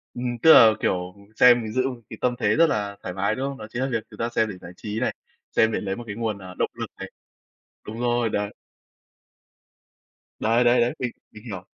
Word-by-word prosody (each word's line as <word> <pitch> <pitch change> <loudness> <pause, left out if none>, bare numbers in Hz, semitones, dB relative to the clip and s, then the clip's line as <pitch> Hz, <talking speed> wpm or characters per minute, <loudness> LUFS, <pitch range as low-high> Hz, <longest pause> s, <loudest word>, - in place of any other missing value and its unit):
Ừm. 120 -1 -3
Tức 160 - +9
là, 110 -2 +9
kiểu, 90 +1 -1 0.2
xem, 120 -2 +6
mình 110 - -6
giữ 130 +1 +1
một 125 -2 -8
cái 110 - -8
tâm 125 -1 +1
thế - - +2
rất 165 +1 +5
là 100 -1 -2
thoải 90 - -5
mái, 95 +2 0
đúng 135 +2 -2
không? 135 - -7
Đó 110 - -8
chính 120 +2 -4
là 135 - +1
việc 115 -2 -1
người - - -14
ta 115 +1 -1
xem 110 -2 0
để 95 - -7
giải 85 0 -11
trí 105 +1 -4
này, - - -1 0.4
xem 110 0 +3
để - - -1
lấy 95 -1 -3
một 120 - -7
cái 100 - -5
nguồn, 110 -3 -2
ờ, 95 -1 -10
động - - 0
lực - - -5
này. - - -7 0.8
Đúng 110 +2 -7
rồi, 120 -1 +1
đấy. 105 -1 -2 1.9
Đấy, 115 +3 +3
đấy, 120 0 +4
đấy. 120 - +1
Mình 125 -2 -2 0.2
mình 105 - -13
hiểu. 95 -5 -7
115 Hz, 240 wpm, -24 LUFS, 105-120 Hz, 1.9 s, Tức